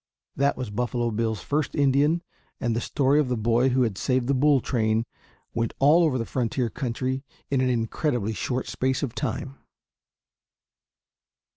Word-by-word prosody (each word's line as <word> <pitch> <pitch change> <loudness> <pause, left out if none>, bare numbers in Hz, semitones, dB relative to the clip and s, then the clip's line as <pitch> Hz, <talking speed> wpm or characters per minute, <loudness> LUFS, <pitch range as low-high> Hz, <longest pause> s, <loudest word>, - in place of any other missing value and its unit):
That 140 +1 +1
was 125 -5 -4
Buffalo 120 +1 -1
Bill's 110 -2 -1
first 145 - -1
Indian, 145 +4 +3 0.4
and 115 -1 0
the 115 - 0
story 140 +2 +2
of 145 -4 +1
the 125 - 0
boy 120 +4 +2
who 130 0 +2
had 110 -5 -2
saved 130 -1 +1
the 140 - +2
bull 140 +1 +4
train 110 -2 0 0.5
went 115 0 -1
all 150 +5 +5
over 150 -6 +2
the 115 - -2
frontier 120 -1 -1
country 130 +1 -2 0.3
in 135 -2 +2
an 130 - +2
incredibly 115 -1 -1
short 125 +4 -2
space 130 +2 -1
of 125 -5 -2
time. 135 +1 -4
130 Hz, 160 wpm, -25 LUFS, 115-140 Hz, 0.5 s, all